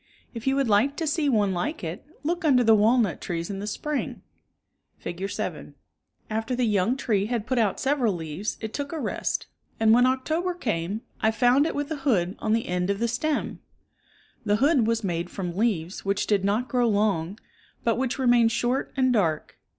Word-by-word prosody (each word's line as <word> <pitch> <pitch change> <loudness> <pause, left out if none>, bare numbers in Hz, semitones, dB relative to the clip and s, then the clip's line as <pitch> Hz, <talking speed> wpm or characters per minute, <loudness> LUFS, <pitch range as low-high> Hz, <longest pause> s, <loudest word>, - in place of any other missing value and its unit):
If 230 +1 -7
you 270 - +3
would 275 -2 +1
like 225 +7 +3
to 325 - -2
see 305 -1 +1
one 205 -6 +2
like 240 - -3
it, 170 +3 -5 0.2
look 345 +4 -1
under 265 -6 +4
the 225 -1 +6
walnut 220 -1 +3
trees 170 +1 -3
in 195 - -5
the 205 - -5
spring 300 +6 -3 0.7
(Fig. 185 +3 -5
7). - - -5 0.5
After 225 +3 -2
the 250 0 +1
young 215 +3 +1
tree 210 -6 0
had 230 -2 -2
put 255 -1 0
out 210 -4 +1
several 265 -5 +1
leaves 165 +5 -4
it 220 -1 -5
took 285 -1 -4
a 325 - -4
rest, - - -2 0.3
and 220 0 +5
when 245 +2 +5
October 315 +8 0
came, 210 - -2 0.2
I 220 - +4
found 245 +6 +3
it - - -3
with 290 +2 -3
a 315 - -2
hood 210 -10 +1
on 215 - 0
the 230 0 0
end 180 +1 -1
of 200 - +1
the 235 +3 0
stem. 285 +6 -2 0.8
The 205 -2 +2
hood 265 -1 +3
was 230 -1 0
made 175 -2 -2
from 180 -3 -5
leaves 195 -5 -1
which 200 0 0
did 200 -3 +1
not 210 +6 +1
grow 245 -1 +2
long, 200 -3 0 0.5
but 230 -2 +2
which 260 -2 -1
remained 240 -3 +4
short 245 +3 -1
and 255 -1 +3
dark. 165 -9 0
225 Hz, 195 wpm, -26 LUFS, 200-260 Hz, 0.8 s, the